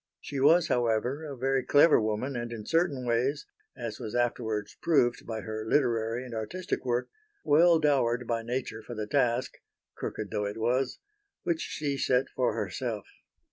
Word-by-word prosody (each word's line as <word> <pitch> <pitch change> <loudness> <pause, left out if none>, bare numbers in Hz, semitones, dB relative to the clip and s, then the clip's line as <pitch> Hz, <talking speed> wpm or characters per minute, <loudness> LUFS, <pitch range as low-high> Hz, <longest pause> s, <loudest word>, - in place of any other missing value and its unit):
She 140 - -5
was, 160 +5 +5
however, 120 +5 0
a 140 -3 -7
very 135 +1 +1
clever 145 -2 +6
woman 110 +5 -2
and 120 0 -4
in 110 -3 -6
certain 165 -5 +1
ways 125 +5 0 0.3
as 120 -3 -5
was 110 - -5
afterwards 115 -3 -1
proved 125 -7 +2
by 110 -1 -4
her 110 +2 -5
literary 115 -1 +1
and 125 - -8
artistic 175 - -3
work 120 -1 0 0.4
well 165 +3 +5
dowered 130 -6 +2
by 115 0 -1
nature 120 -1 -4
for 120 +2 -8
the 105 -1 -3
task 125 0 0 0.4
crooked 105 - -5
though 105 -1 -1
it 100 - -5
was 125 +3 0 0.5
which 170 -2 0
she 140 -2 -3
set 130 +1 +2
for 125 -4 0
herself. 105 0 -3
120 Hz, 165 wpm, -29 LUFS, 115-140 Hz, 0.5 s, clever